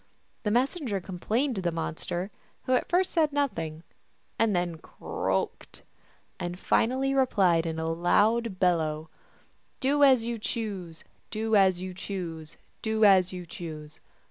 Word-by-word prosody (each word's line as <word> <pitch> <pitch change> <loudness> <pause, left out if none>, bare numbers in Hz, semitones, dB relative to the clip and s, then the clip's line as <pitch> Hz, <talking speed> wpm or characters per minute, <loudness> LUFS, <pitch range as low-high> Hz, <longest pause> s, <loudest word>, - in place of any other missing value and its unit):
The 210 - -1
messenger 250 - 0
complained 215 +8 -1
to - - -1
this 175 -1 0
monster, 170 +3 -3 0.3
who 255 - 0
at 250 - +1
first 365 +2 +2
said 315 -3 +2
nothing, 165 - -2 0.6
and 225 -3 +3
then 175 -2 -1
croaked, - - -3 0.6
and 175 0 -4
finally 260 +7 +1
re 265 -1 +3
plied 175 -7 +3
in 160 0 -3
a 160 0 -2
loud 205 +6 +2
bellow, 160 -4 +1 0.3
" - - -39
Do 285 +2 +2
as 260 -4 +6
you 235 0 -3
choose, 195 -8 -4 0.3
Do 220 0 0
as 190 -3 +4
you 185 0 -5
choose, 175 -5 -6 0.2
Do 220 0 +2
as 190 -2 +6
you 180 -1 -6
choose. 155 -3 -8
190 Hz, 145 wpm, -28 LUFS, 170-235 Hz, 0.6 s, as